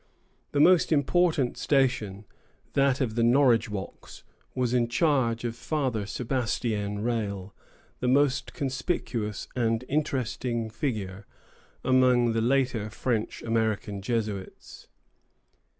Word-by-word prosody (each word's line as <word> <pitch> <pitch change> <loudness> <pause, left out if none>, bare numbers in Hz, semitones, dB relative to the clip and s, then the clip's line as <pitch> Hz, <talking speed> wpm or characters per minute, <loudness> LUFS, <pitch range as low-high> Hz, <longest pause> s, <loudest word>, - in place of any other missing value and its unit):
The 145 - 0
most 180 +3 +5
important 155 -2 +2
station, 125 -8 +1 0.5
that 140 -1 +2
of 120 -4 0
the 115 - 0
Norridgewocks, 115 -5 +1 0.3
was 125 -1 0
in 120 -2 +2
charge 120 -4 +1
of 115 -1 -3
Father 125 -7 -2
Sebastien 110 -4 -2
Rale, 100 -5 -2 0.5
the 125 - -1
most 135 0 +2
conspicuous 130 - -3
and 115 0 0
interesting 125 -5 -1
figure 105 -6 -4 0.6
among 125 -2 +4
the 115 - +1
later 125 -3 +1
French 115 0 -2
American 110 -3 -1
Jesuits. 105 -3 -4
120 Hz, 105 wpm, -27 LUFS, 110-135 Hz, 0.6 s, most